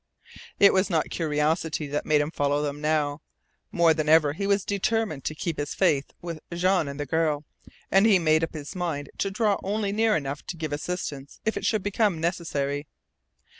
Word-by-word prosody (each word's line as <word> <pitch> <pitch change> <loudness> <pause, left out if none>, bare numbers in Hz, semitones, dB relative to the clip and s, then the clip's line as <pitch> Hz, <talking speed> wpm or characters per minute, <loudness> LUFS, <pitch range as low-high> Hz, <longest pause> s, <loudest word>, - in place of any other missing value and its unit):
It 200 - +7
was 190 +2 +2
not 160 -4 0
curiosity 155 0 0
that 145 +1 -3
made 150 -1 +4
him 145 +2 -2
follow 145 -1 0
them 145 0 -3
now. 150 -1 0 0.5
More 170 -2 +4
than 155 -1 -1
ever 155 -2 +5
he 200 +5 -3
was 200 -1 +2
determined 205 - -1
to 155 - -2
keep 160 0 -3
his 145 0 -3
faith 155 -7 +2
with 170 -2 -5
Jean 180 -1 +2
and 140 +1 -6
the 145 - -2
girl, 155 0 0 0.5
and 195 +3 +5
he 205 -4 +6
made 160 -2 +3
up 165 - -3
his 150 +5 -7
mind 160 -6 -3
to 195 - +1
draw 205 0 +1
only 205 0 -1
near 220 +1 +2
enough 140 -2 -3
to 175 - -5
give 155 -2 -4
his 145 +1 -3
assistance 145 -6 -5
if 220 - 0
it - - -3
should 215 -4 +1
become 205 -3 +1
necessary. 150 -4 -2
160 Hz, 200 wpm, -26 LUFS, 145-190 Hz, 0.5 s, It